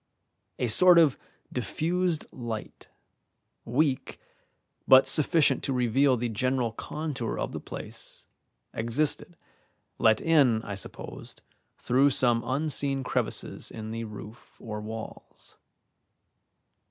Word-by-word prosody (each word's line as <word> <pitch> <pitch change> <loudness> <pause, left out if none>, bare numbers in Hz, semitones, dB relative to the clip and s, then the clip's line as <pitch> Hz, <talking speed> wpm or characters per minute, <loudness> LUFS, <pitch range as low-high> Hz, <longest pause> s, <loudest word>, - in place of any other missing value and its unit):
A 125 - -1
sort 180 +10 +6
of 155 -5 +5 0.4
diffused 165 +6 -1
light, 115 -4 -7 0.8
weak, 130 +2 -1 0.7
but 130 0 +7
sufficient 150 -3 +5
to 135 - -1
reveal 125 +2 +2
the 120 +1 -2
general 125 +1 -1
contour 145 0 -5
of - - -3
the - - -5
place, - - -8 0.5
existed, 145 +8 -2 0.6
let 110 -1 +4
in, 135 -9 +3
I 100 - -6
supposed, 95 - -9 0.3
through 135 +3 +3
some 120 -3 +2
unseen 140 -1 -1
crevices - - -2
in 110 0 -7
the 115 0 -4
roof 105 +1 -12
or 105 -2 -6
walls. 110 +1 -10
130 Hz, 105 wpm, -27 LUFS, 115-150 Hz, 0.8 s, but